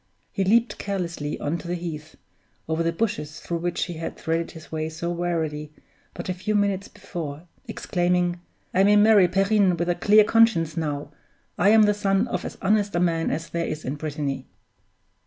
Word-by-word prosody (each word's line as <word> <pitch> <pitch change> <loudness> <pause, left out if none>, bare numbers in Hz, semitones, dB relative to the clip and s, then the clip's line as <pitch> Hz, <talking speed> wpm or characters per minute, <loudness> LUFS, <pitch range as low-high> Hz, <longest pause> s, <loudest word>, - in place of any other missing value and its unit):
He 195 - -1
leaped 230 +5 +2
carelessly 170 -7 -3
on 160 +4 -2
to - - -9
the 175 - -1
heath, 160 -3 -6 0.5
over 160 +1 0
the 165 0 +1
bushes 160 -6 -3
through 170 -1 -3
which 175 0 -1
he 175 - -4
had 165 - -5
threaded 165 +1 -1
his 160 -1 -12
way 155 0 -2
so 170 +2 -4
warily 160 -4 -2 0.4
but 175 - -6
a 185 - -1
few 190 +4 -2
minutes 200 -1 +1
before, 165 -7 -7 0.2
exclaiming, 175 0 0 0.3
"I 190 - +4
may 205 +1 +5
marry 205 -3 +6
Perrine 195 0 +2
with 170 +1 -1
a - - +4
clear 210 +4 +5
conscience 210 -8 +3
now; 145 -3 -3 0.4
I 200 - +3
am 220 0 +7
the 210 0 +4
son 200 +2 +1
of 180 - -3
as - - -6
honest 205 0 +2
a - - +2
man 165 -2 +1
as 165 +1 -3
there 170 0 -2
is 155 0 -5
in 130 - -2
Brittany!" 145 -3 -4
175 Hz, 190 wpm, -24 LUFS, 160-200 Hz, 0.5 s, am